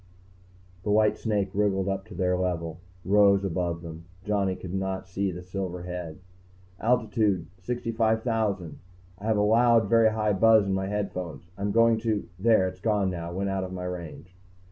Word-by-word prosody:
The 105 - -4
white 105 +1 +4
snake 105 -4 -1
wriggled 100 -2 +1
up 95 +1 -3
to 105 - -11
their 90 -1 +1
level, 85 -3 -2 0.3
rose 100 0 +4
above 85 -2 -2
them. 80 0 -9 0.2
Johnny 100 -3 0
could 90 -1 -8
not 95 0 -3
see 95 +1 -1
the 90 +1 -8
silver 90 -1 -5
head. 90 -3 -6 0.6
"Altitude... 110 -6 +1
65,000.... 110 - -1 0.4
I 100 - -9
have 110 -1 +2
a - - +3
loud, 115 +1 +4
very 115 0 +5
high 105 -1 0
buzz 110 +1 +5
in 95 - -1
my 95 0 -1
headphones. 90 -5 -4
I'm 100 +1 -2
going 115 0 +4
to 110 -2 -1
there, 110 -2 +4
it's 95 0 -7
gone 105 -4 +1
now, 85 -1 -5
went 95 +2 -2
out 95 -1 -1
of 95 0 -6
my 90 0 -5
range." 90 0 -7
95 Hz, 170 wpm, -27 LUFS, 90-110 Hz, 0.6 s, very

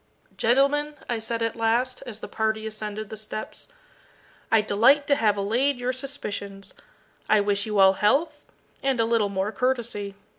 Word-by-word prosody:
"Gentlemen," 280 +5 +2
I 235 -2 -1
said 230 +1 -2
at 230 - -1
last, 235 +3 0
as 225 -2 -7
the - - -6
party 220 0 -1
ascended 215 -1 -5
the - - -5
steps, 215 0 -7 0.8
"I 225 - +5
delight 240 +8 +4
to 285 - +3
have 215 -6 +2
allayed 245 +7 +1
your 250 +1 -1
suspicions. 205 -7 -7 0.6
I 215 - +5
wish 205 0 +1
you 210 -1 -2
all 190 -1 +7
health, 280 - +1 0.3
and 270 -3 0
a 225 - +3
little 225 -3 +1
more 195 +1 -2
courtesy. 235 -6 -2
225 Hz, 160 wpm, -25 LUFS, 210-255 Hz, 0.8 s, all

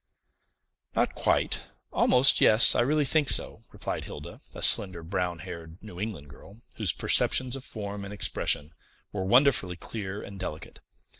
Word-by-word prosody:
"Not - - 0
quite - - -1 0.2
almost 125 +2 +4
yes, 110 +2 +6
I - - +1
really 145 +4 +1
think 150 +1 +2
so," - - +2
replied - - -5
Hilda, - - -10 0.2
a - - -6
slender, 95 -4 +4
brown 90 0 -3
haired, 80 0 -10
New 90 -5 -12
England 95 -9 -6
girl, 100 - -16
whose 105 -7 +1
perceptions 130 0 +2
of 135 - -8
form 100 -4 -7
and 100 - -8
expression 80 -6 -2 0.4
were 100 -2 -4
wonderfully 120 -4 +2
clear 100 +2 -7
and 100 -1 -10
delicate. 75 -1 -7
100 Hz, 150 wpm, -27 LUFS, 90-120 Hz, 0.4 s, yes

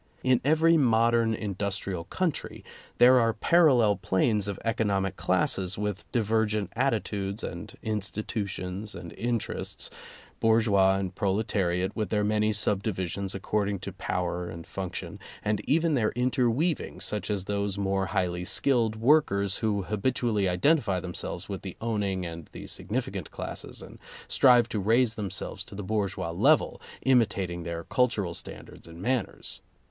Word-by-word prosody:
In 130 -1 +3
every 160 +4 +4
modern 115 -3 +3
industrial 100 -4 -3
country, 165 - -3 0.3
there 125 +1 +7
are 115 -1 +2
parallel 130 - +4
planes 100 +2 +1
of 100 -1 -4
economic 100 -4 0
classes 95 0 +1
with 105 -1 -4
divergent 110 -3 0
attitudes 105 -5 -1
and - - -7
institutions 100 -2 -3
and 85 - -8
interests 120 -1 -3 0.2
— - - -22
bourgeois 105 -4 +4
and 95 -1 -3
proletariat, 95 -2 0
with 110 -5 -2
their 105 0 +1
many 105 +1 +2
subdivisions 100 -2 -1
ac 95 - -5
cording 100 -1 0
to - - -7
power 90 0 -2
and 85 0 -8
function, 95 -2 -6 0.3
and 105 -1 +1
even 160 +2 +3
their 115 -6 +2
interweaving, 125 +5 0
such 105 0 -2
as 100 -3 -1
those 100 0 -2
more 95 -1 0
highly 90 -2 -1
skilled 115 +2 +2
workers 110 -6 +3
who 105 -3 0
habitually 105 -1 0
identify 100 - +2
themselves 90 0 -5
with 100 -2 -5
the 95 -3 -8
owning 100 -5 -1
and 85 -2 -7
the - - -8
significant - - -4
classes - - -6
and - - -12 0.3
strive 125 -3 +5
to 110 -3 -2
raise 115 +4 +3
themselves 95 -2 -3
to 100 - -9
the 105 - -5
bourgeois 100 -4 -1
level, 85 - +3 0.2
imitat 110 -8 +3
ing 85 0 -5
their 85 0 -4
cultural 110 -8 +1
standards - - -9
and 85 0 -11
manners. 120 +2 -2
105 Hz, 140 wpm, -28 LUFS, 95-115 Hz, 0.3 s, there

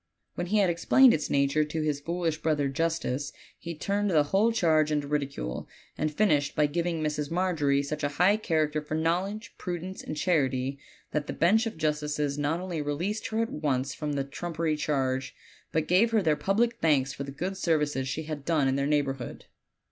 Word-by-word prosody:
When 175 - -3
he 210 +4 +1
had 195 -3 +4
explained 240 +9 +5
its 155 - -1
nature 140 +2 +2
to 155 +1 -3
his 150 -2 0
foolish 165 0 -2
brother 150 -3 +1
justice 145 -2 -1 0.3
he 170 0 -6
turned 200 +6 -1
the 155 -5 +4
whole 195 +10 +2
charge 160 -8 +3
into 145 -1 0
ridicule, 140 - -3 0.3
and 155 +1 -1
finished 150 -5 +2
by 150 - +4
giving 165 +1 -1
Mrs. 150 -1 -2
Margery 165 -6 +1
such 150 +2 -4
a 145 - +2
high 195 +4 +5
character 155 -6 0
for 150 +1 -4
knowledge, 180 +7 -1
prudence, 180 +1 -5
and 155 - -6
charity 140 -5 0 0.3
that 150 -1 -2
the - - -3
bench 220 +7 +3
of 220 - -6
justices 150 -2 -1
not 145 +3 0
only 180 -4 -3
released 170 +9 -2
her 225 +1 0
at 230 - -5
once 140 -3 -1
from 150 -1 -3
the 140 -1 0
trumpery 160 +2 -2
charge, 135 -3 -1 0.4
but 155 0 0
gave 190 +6 +4
her 220 -3 +2
their 155 -3 +3
public 230 +7 +1
thanks 140 -4 +2
for 140 - -5
the 140 - -7
good 180 +8 -3
services 150 -7 0
she 155 +4 -3
had 150 -2 -6
done 155 -3 +2
in 135 +1 +1
their 140 0 0
neighborhood. 140 -4 -1
155 Hz, 195 wpm, -28 LUFS, 145-175 Hz, 0.4 s, explained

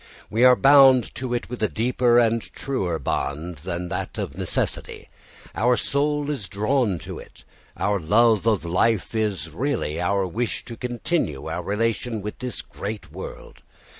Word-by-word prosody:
We 115 +3 +2
are 125 0 +8
bound 135 -2 +6
to 130 -1 -5
it 120 - -3
with 125 -1 -7
a 110 - +3
deeper 120 +2 +2
and 115 -1 +3
truer 95 -13 -3
bond 80 +3 -3
than 90 +2 -4
that - - -4
of - - -4
necessity. - - -3 0.4
Our 125 +1 +2
soul 145 +4 0
is 110 -11 -5
drawn 105 0 +1
to - - -6
it; - - -14 0.3
our 100 -1 +1
love 110 +5 +3
of 105 -6 +2
life 100 +7 +1
is 100 -8 -1
really 110 - -2
our 100 +2 +1
wish 110 +6 -3
to 120 - -7
continue 120 - -2
our - - -3
relation 115 +1 -1
with 105 - -6
this 125 -3 -4
great 100 -7 -7
world. 95 +4 -9
110 Hz, 160 wpm, -24 LUFS, 95-125 Hz, 0.4 s, are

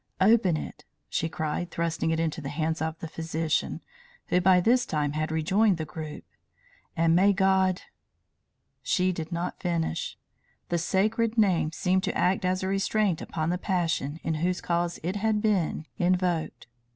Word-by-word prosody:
"Open 195 -4 +4
it!" - - -7 0.3
she 165 - -1
cried, 160 +2 -3
thrusting 165 -1 -1
it 160 0 0
into 160 -1 -1
the 140 - -5
hands 160 +2 -2
of 160 0 -2
the 165 - -6
physician, 160 0 -2 0.5
who 180 - +3
by 180 0 +5
this 245 +7 +3
time 150 -8 -1
had 155 +1 -2
rejoined 185 +5 +2
the 160 - -3
group. 155 -1 -7 0.7
"And 165 0 +4
may 200 +3 +5
God 190 -1 +2 0.5
" - - -50
She 185 -2 +3
did 165 -1 -5
not 170 +1 -3
finish. 170 - -2 0.5
The 175 - +1
sacred 220 +6 +1
name 185 -7 +3
seemed 185 +3 +1
to - - -2
act 185 +1 +1
as 185 +1 0
a - - -1
restraint 195 -2 +1
upon 160 0 -2
the 180 - -1
passion 165 -6 -1
in 160 - -1
whose 180 +1 0
cause 170 0 -1
it 185 +5 -2
had 215 +1 +1
been 195 -7 0
invoked. 180 -2 0
175 Hz, 165 wpm, -27 LUFS, 160-190 Hz, 0.7 s, by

